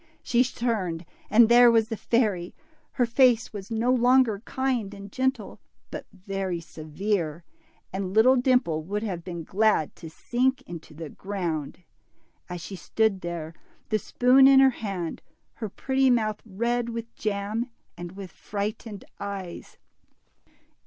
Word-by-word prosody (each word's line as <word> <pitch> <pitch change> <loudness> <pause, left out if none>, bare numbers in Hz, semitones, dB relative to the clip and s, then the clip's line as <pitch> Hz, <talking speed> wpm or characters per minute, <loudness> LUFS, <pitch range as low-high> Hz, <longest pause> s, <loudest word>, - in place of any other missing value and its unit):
She 240 +1 +3
turned, 210 -9 -2 0.2
and 225 +2 +7
there 240 +1 +7
was 225 -1 +3
the 225 - -2
fairy! 210 -7 0 0.4
Her 245 - +2
face 235 -1 +3
Avas 200 -2 -8
no 230 +2 +1
longer 250 -4 +3
kind 250 -6 -2
and 200 0 -10
gentle, 260 -4 -2 0.3
but - - -7
very 195 -2 -4
severe, 165 +1 -3 0.5
and 190 -1 -3
little 225 +6 +5
Dimple 250 -11 +2
would 205 +6 -3
have 180 -6 -4
been^glad 180 +1 0
to 165 - -9
sink 255 +10 0
into 165 -2 -10
the 155 -1 -7
ground, 175 -5 -4 0.7
as 175 -1 -5
she 190 +3 -7
stood 210 0 0
there, 170 -2 -5 0.4
the 215 - +1
spoon 255 +5 +5
in 270 -1 +7
her 270 0 +6
hand, 195 -8 -5 0.3
her 220 -3 -5
pretty 265 +5 +1
mouth 220 -4 +1
red 235 +4 -1
with 230 0 -6
jam, 210 +3 -2 0.3
and 175 0 -8
with 190 -2 -9
frightened 210 0 -5
eyes. 195 -3 -7
210 Hz, 140 wpm, -26 LUFS, 180-240 Hz, 0.7 s, and